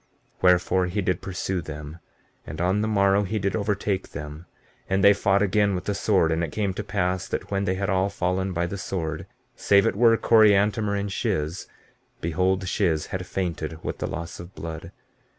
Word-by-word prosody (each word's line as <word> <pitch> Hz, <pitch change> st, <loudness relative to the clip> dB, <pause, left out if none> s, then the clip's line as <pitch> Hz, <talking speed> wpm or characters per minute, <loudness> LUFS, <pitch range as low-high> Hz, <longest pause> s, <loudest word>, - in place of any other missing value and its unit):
15:29 -, -, -33 dB
Wherefore, 90 Hz, 0 st, +3 dB
he 100 Hz, +4 st, -2 dB
did 90 Hz, 0 st, 0 dB
pursue 95 Hz, -1 st, -3 dB
them, 75 Hz, 0 st, -8 dB, 0.5 s
and 80 Hz, -, -7 dB
on 95 Hz, +4 st, +1 dB
the 110 Hz, -, 0 dB
morrow 100 Hz, -1 st, +3 dB
he 105 Hz, +2 st, -2 dB
did 100 Hz, -1 st, -1 dB
overtake 100 Hz, -2 st, -2 dB
them; 75 Hz, +3 st, -8 dB, 0.4 s
and 95 Hz, 0 st, +1 dB
they 100 Hz, 0 st, +8 dB
fought 100 Hz, 0 st, +2 dB
again 100 Hz, 0 st, +2 dB
with 90 Hz, -, -3 dB
the 100 Hz, -, -1 dB
sword. 95 Hz, -4 st, +2 dB
And 80 Hz, +1 st, 0 dB
it 80 Hz, -, -3 dB
came 100 Hz, 0 st, -1 dB
to 105 Hz, -, -4 dB
pass 95 Hz, -2 st, -1 dB
that -, -, -4 dB
when 100 Hz, 0 st, 0 dB
they 95 Hz, -, 0 dB
had 100 Hz, +1 st, -2 dB
all 95 Hz, +1 st, +1 dB
fallen 95 Hz, 0 st, -1 dB
by 85 Hz, -1 st, -1 dB
the 95 Hz, +3 st, -5 dB
sword, 80 Hz, -5 st, -4 dB, 0.3 s
save 100 Hz, -1 st, +4 dB
it -, -, +1 dB
were 115 Hz, +1 st, +5 dB
Coriantumr 105 Hz, -1 st, +4 dB
and 100 Hz, 0 st, -3 dB
Shiz, 95 Hz, -, -2 dB, 0.5 s
behold 95 Hz, +3 st, 0 dB
Shiz 85 Hz, -5 st, 0 dB
had 90 Hz, -1 st, -3 dB
fainted 80 Hz, -4 st, -3 dB
with -, -, -4 dB
the -, -, -2 dB
loss 85 Hz, 0 st, -6 dB
of 85 Hz, +2 st, -11 dB
blood. 80 Hz, -1 st, -7 dB
95 Hz, 195 wpm, -25 LUFS, 85-100 Hz, 0.5 s, they